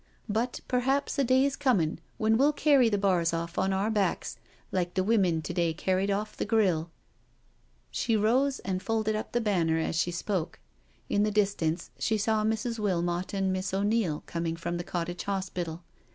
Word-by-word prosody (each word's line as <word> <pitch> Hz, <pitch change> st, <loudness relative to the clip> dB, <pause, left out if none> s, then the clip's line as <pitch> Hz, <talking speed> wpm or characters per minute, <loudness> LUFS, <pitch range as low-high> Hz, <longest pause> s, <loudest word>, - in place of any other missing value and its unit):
But 230 Hz, +3 st, -1 dB
perhaps 265 Hz, +3 st, 0 dB
a -, -, +4 dB
day's 260 Hz, +2 st, +3 dB
coming 200 Hz, -, +1 dB, 0.2 s
when 220 Hz, +1 st, +3 dB
we*ll 280 Hz, +5 st, +4 dB
carry 280 Hz, -5 st, +4 dB
the 205 Hz, -, +1 dB
bars 180 Hz, -4 st, +2 dB
off 170 Hz, +1 st, -3 dB
on 190 Hz, -, +1 dB
our 195 Hz, +3 st, 0 dB
backs, 205 Hz, -3 st, -1 dB, 0.3 s
like 180 Hz, -1 st, -1 dB
the 185 Hz, -, +2 dB
women 185 Hz, -7 st, +2 dB
to -, -, -4 dB
day 170 Hz, -2 st, 0 dB
carried 190 Hz, +3 st, 0 dB
off 210 Hz, +2 st, -2 dB
the -, -, -2 dB
grille.'* 190 Hz, -7 st, +1 dB, 1.0 s
She 225 Hz, -2 st, +1 dB
rose 255 Hz, +6 st, +2 dB
and 185 Hz, -1 st, -2 dB
folded 220 Hz, 0 st, 0 dB
up 215 Hz, -, -4 dB
the 240 Hz, -, +1 dB
banner 175 Hz, -7 st, +1 dB
as 160 Hz, +1 st, -1 dB
she 170 Hz, +2 st, +1 dB
spoke. 175 Hz, 0 st, -2 dB, 0.5 s
In 205 Hz, -, +1 dB
the 210 Hz, -, +3 dB
distance 200 Hz, -6 st, 0 dB
she 220 Hz, -, +1 dB
saw 215 Hz, +1 st, +1 dB
Mrs. 225 Hz, +2 st, -1 dB
Wilmot 175 Hz, -3 st, -1 dB
and 190 Hz, -1 st, +1 dB
Miss 185 Hz, 0 st, -2 dB
O'Neil 200 Hz, -5 st, 0 dB
coming 165 Hz, -1 st, -2 dB
from 170 Hz, +1 st, -3 dB
the 175 Hz, -, -4 dB
Cottage 175 Hz, 0 st, -4 dB
Hospital. 180 Hz, -4 st, -3 dB
195 Hz, 180 wpm, -28 LUFS, 175-220 Hz, 1.0 s, a